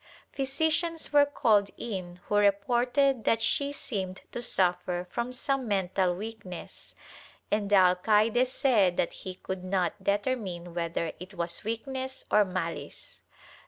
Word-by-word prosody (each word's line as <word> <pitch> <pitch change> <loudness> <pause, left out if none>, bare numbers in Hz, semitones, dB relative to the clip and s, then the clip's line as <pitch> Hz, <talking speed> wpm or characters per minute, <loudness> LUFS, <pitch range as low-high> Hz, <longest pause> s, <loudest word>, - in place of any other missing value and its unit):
Physicians 315 +4 0
were 290 -1 +6
called 215 -8 +3
in, 180 -5 -6
who - - -4
reported 240 +6 +3
that 225 - +3
she 280 +6 +1
seemed 195 -9 -4
to 240 - -4
suffer 180 -4 0
from 235 +1 -2
some 265 0 -1
mental 190 -2 +1
weakness, 200 -3 -8 0.6
and 210 -1 +1
the 205 - +5
alcaide 210 +6 +4
said 235 -9 +2
that - - 0
he 185 -1 -7
could 185 0 -6
not 185 +1 -1
determine 200 -5 -1
whether 170 -1 -2
it 185 +2 -10
was 170 -1 -2
weakness 260 +4 -4
or 210 - +6
malice. 170 -6 -5
205 Hz, 130 wpm, -29 LUFS, 180-250 Hz, 0.6 s, were